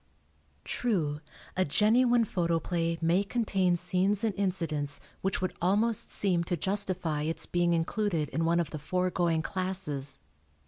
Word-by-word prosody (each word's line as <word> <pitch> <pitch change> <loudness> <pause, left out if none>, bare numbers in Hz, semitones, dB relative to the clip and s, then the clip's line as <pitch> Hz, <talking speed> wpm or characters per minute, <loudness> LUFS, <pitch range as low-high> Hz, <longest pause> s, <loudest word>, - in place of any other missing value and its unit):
] - - -38
True, 160 -11 -1 0.3
a 185 - +2
genuine 235 - +4
photoplay 170 -2 -1
may 170 +4 +3
contain 195 -5 +1
scenes 185 +4 +1
and 220 -2 +1
incidents 165 -7 -2 0.2
which 190 -1 -1
would 185 - -1
almost 210 +5 +2
seem 180 -4 +1
to 175 - -1
justify 185 -4 0
its 160 +2 -2
being 175 0 +1
included 170 -1 0
in 165 - -1
one 170 +1 +2
of 165 -3 -2
the 155 - -5
foregoing 175 0 0
classes. 180 -8 -1
180 Hz, 140 wpm, -29 LUFS, 165-195 Hz, 0.3 s, genuine